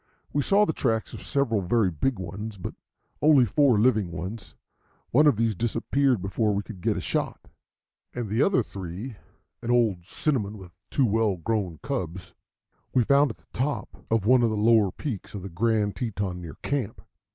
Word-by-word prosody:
We 145 - +2
saw 200 +8 +4
the 160 - -1
tracks 110 -6 -1
of - - -7
several 130 -8 0
very 95 +1 +2
big 120 - -1
ones, 105 +3 -6
but 90 - -6 0.5
only 145 -5 +6
four 130 +1 +3
living 110 -6 +2
ones. 95 +6 -6 0.6
One 150 +5 +5
of 140 -8 +4
these 115 -1 +2
disappeared 120 +2 +1
before 105 +2 0
we 100 - -1
could 100 -4 -10
get - - +1
a - - -1
shot, - - -3 0.6
and 120 -2 -4
the 110 +5 0
other 190 +4 +3
three, 100 +5 -7 0.4
an 120 - -5
old 115 -8 +2
cinnamon 110 -9 -1
with 95 -3 -12 0.2
two 135 - +2
well 110 -2 +2
grown 90 -2 -2
cubs, 95 - -4 0.6
we 125 - +5
found 140 +4 +4
at 110 - -7
the - - -29
top 140 +4 -3
of 110 -3 +1
one 125 +2 +5
of 115 - +3
the 110 - -2
lower 110 -2 +4
peaks 110 -5 -6
of 100 - -6
the 95 - -6
Grand 105 +2 +1
Teton 100 -7 -3
near 80 -4 -8
camp. 130 -6 -2
110 Hz, 185 wpm, -26 LUFS, 95-125 Hz, 0.6 s, only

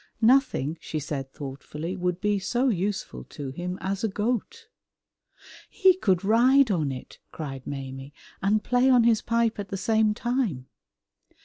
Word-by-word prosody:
"Nothing," 225 - +3
she 155 - -5
said 135 -2 -4
thoughtfully, 150 +5 -6
"would 180 -1 -2
be 205 0 +1
so 245 +7 +1
useful 200 -1 -2
to 140 -3 -7
him 180 +5 -5
as 195 +2 -3
a - - +3
goat." 240 - -3 1.0
"He 380 -3 +4
could 190 - +1
ride 245 +4 +5
on 155 -7 0
it," 130 -1 -9
cried 135 -4 -7
Maimie, 135 0 -6 0.3
"and 210 +2 +2
play 250 +1 +3
on 250 -2 +6
his 230 -2 +3
pipe 230 -2 0
at 200 - -4
the 195 - -3
same 220 +1 +2
time!" 235 - -1
200 Hz, 150 wpm, -26 LUFS, 155-235 Hz, 1.0 s, on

